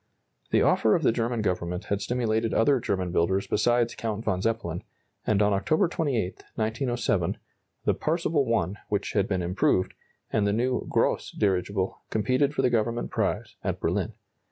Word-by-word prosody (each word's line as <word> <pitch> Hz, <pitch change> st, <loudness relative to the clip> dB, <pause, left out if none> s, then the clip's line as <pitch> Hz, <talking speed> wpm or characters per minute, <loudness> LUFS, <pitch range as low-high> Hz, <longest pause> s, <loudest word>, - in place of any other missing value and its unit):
The -, -, +3 dB
offer -, -, +4 dB
of -, -, 0 dB
the -, -, +5 dB
German 115 Hz, -1 st, -1 dB
Government 90 Hz, -2 st, -1 dB
had 100 Hz, 0 st, -1 dB
stimulated 115 Hz, 0 st, 0 dB
other 135 Hz, +4 st, +4 dB
German 95 Hz, -5 st, -1 dB
builders 95 Hz, +4 st, +1 dB
besides 120 Hz, +2 st, +2 dB
Count 110 Hz, -1 st, -3 dB
von 95 Hz, -4 st, 0 dB
Zeppelin, 105 Hz, -6 st, -2 dB, 0.4 s
and 105 Hz, -1 st, +3 dB
on 105 Hz, 0 st, +3 dB
October 155 Hz, -, +2 dB
28, 135 Hz, -, -1 dB, 0.2 s
1907, 120 Hz, +3 st, 0 dB, 0.5 s
the -, -, +3 dB
Parseval 155 Hz, -5 st, 0 dB
I, 95 Hz, +2 st, -1 dB
which 105 Hz, -1 st, -1 dB
had 100 Hz, -1 st, +2 dB
been 95 Hz, -3 st, -1 dB
improved, 90 Hz, +1 st, +1 dB, 0.4 s
and 105 Hz, -2 st, +2 dB
the 100 Hz, -, +2 dB
new 125 Hz, +3 st, 0 dB
Gross -, -, +1 dB
dirigible, 95 Hz, -1 st, 0 dB
competed 130 Hz, +6 st, +1 dB
for 135 Hz, -, +1 dB
the 125 Hz, -, +3 dB
government 115 Hz, +1 st, 0 dB
prize, -, -, -2 dB
at -, -, -2 dB
Berlin. -, -, -1 dB
110 Hz, 160 wpm, -27 LUFS, 95-120 Hz, 0.5 s, the